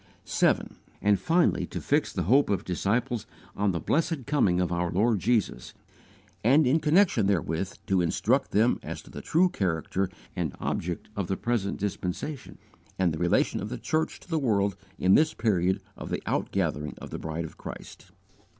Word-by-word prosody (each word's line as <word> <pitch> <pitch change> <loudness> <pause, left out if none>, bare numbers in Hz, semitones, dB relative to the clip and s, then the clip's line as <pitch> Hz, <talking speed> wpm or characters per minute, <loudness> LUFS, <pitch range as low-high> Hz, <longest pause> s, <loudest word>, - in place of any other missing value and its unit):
7. - - +1 0.2
And 105 -2 +3
finally 170 - +2
to - - -5
fix 145 +1 +1
the 90 - -2
hope 130 - +4
of 100 -4 0
disciples 115 +6 -1 0.3
on 100 0 +1
the 85 - -2
blessed 155 - 0
coming 125 -12 +2
of 90 -1 0
our 85 0 0
Lord 105 +5 +2
Jesus; 110 - 0 0.7
and, 140 +7 +5
in 135 +6 +3
connection 155 - +3
therewith, 90 -1 0
to 95 -2 +2
instruct 85 - +1
them 115 +4 +3
as - - -7
to - - -15
the - - -7
true 175 +4 +3
character 95 - -1 0.3
and 85 -6 -2
object 85 +3 -3
of 100 -3 -2
the 95 - -1
present 115 -5 -1
dispensation, 105 - -4 0.4
and 90 -3 +2
the 80 - -4
relation - - +2
of 105 - -4
the 125 - -4
church 155 +5 -1
to - - -17
the 165 -3 0
world 100 -7 +1 0.2
in 95 +1 +4
this 155 +6 +4
period 95 -4 +1 0.2
of - - -8
the - - -3
out - - -1
gathering 75 0 -1
of - - -9
the - - -5
Bride 80 +1 -4
of - - -11
Christ. - - -9
100 Hz, 180 wpm, -27 LUFS, 90-135 Hz, 0.7 s, and